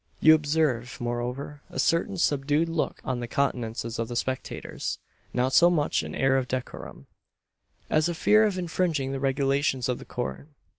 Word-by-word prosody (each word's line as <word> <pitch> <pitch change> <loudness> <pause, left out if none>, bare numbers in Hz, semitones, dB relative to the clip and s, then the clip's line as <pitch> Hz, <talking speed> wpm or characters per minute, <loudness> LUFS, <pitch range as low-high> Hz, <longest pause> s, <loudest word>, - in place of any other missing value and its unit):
You 155 - +8
observe, 145 -5 +1
moreover, 125 +4 -4
a - - -9
certain 180 +4 +1
subdued 145 0 +1
look 165 -1 -2
on 130 -1 -1
the 120 - -4
countenances 115 -4 -2
of 115 - -1
the 120 - -6
spectators 130 +2 -3 0.3
not 125 +1 0
so 175 +5 +7
much 155 -4 +1
an - - -6
air 135 0 +3
of 130 -1 -1
decorum, 125 0 -6 0.8
as 155 +2 +2
a 170 - -2
fear 215 +6 +5
of 195 -3 -3
infringing 165 -6 -1
the 135 - -3
regulations 135 -1 +1
of 125 -1 -1
the - - -10
Court. 125 +3 -5
135 Hz, 165 wpm, -27 LUFS, 125-155 Hz, 0.8 s, You